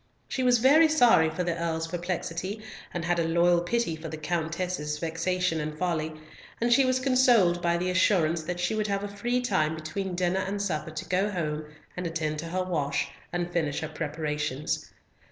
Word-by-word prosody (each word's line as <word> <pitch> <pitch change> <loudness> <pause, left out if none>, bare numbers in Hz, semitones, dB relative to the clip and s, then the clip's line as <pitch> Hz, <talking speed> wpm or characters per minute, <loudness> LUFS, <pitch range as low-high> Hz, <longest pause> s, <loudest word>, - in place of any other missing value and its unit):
She 260 - -2
was 250 -1 +5
very 285 +7 +6
sorry 245 - +5
for 180 +3 -2
the 170 -1 -1
Earl's 165 -1 -2
perplexity, 175 +3 -4 0.3
and 175 -1 -3
had 175 0 +1
a - - +2
loyal 170 +1 +4
pity 205 -1 0
for 160 0 -7
the 160 - -6
Countess's 160 -1 -2
vexation 165 +1 -1
and 150 0 -4
folly, 160 -2 -1 0.4
and 240 +1 +3
she 270 +2 +5
was 255 0 +2
consoled 245 -9 +4
by 170 0 +2
the 180 +1 -1
assurance 170 -3 +3
that 175 +3 -4
she 175 +4 0
would 215 -1 0
have 200 0 -1
a - - -2
free 240 +5 -1
time 160 -10 +1
between 175 +4 -4
dinner 180 +1 +1
and 200 +1 -2
supper 175 -5 -2
to 155 0 -6
go 190 +3 +1
home 155 -5 -3 0.3
and 180 -1 -3
attend 155 -2 -2
to 165 - -5
her 185 +2 -1
wash, 155 -6 -1 0.2
and 175 0 -3
finish 155 -4 0
her 160 - -4
preparations. 150 -2 -3
175 Hz, 190 wpm, -27 LUFS, 160-195 Hz, 0.4 s, very